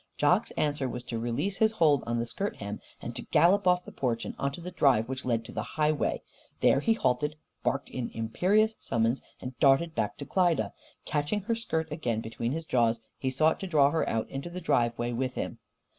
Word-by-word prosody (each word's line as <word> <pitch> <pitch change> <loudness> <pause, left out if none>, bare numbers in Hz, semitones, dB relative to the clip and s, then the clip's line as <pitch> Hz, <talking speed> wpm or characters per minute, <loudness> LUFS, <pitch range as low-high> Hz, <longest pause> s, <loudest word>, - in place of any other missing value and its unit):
Jock's - - +3
answer 145 -3 0
was 125 0 -5
to 120 -2 -4
release 130 - -1
his 220 0 +3
hold 155 - +3
on 120 0 0
the 115 - 0
skirt 125 - -3
hem, 100 0 -6 0.2
and - - -5
to - - -3
gallop 185 +3 +3
off 180 0 +3
the - - -9
porch 120 -3 -1
and - - -5
out - - -2
onto 140 +4 -2
the 180 +2 -7
drive 135 -9 +3
which 130 0 -5
led 115 -2 0
to - - -8
the - - -3
highway. 155 -1 0 0.4
There 135 - +5
he 225 +10 +3
halted, 150 - 0 0.3
barked 140 +1 -1
in 125 -2 -4
imperious 190 - +2
summons 115 +3 0 0.2
and 125 0 -7
darted 140 +4 +4
back - - -1
to - - -6
Klyda. 170 - +2 0.3
Catching 150 +8 -1
her 225 +4 -1
skirt 160 -9 -2
again 120 -8 -1
between 115 +1 -3
his 160 +3 -3
jaws, 120 -7 +2 0.2
he 130 - 0
sought 155 +4 +2
to 195 - -4
draw 145 -5 +4
her 160 - 0
out 110 -1 -1
onto 135 +5 -4
the 180 +1 -6
driveway 120 -5 +1
with 125 +1 -2
him. - - -4
140 Hz, 215 wpm, -29 LUFS, 120-170 Hz, 0.4 s, There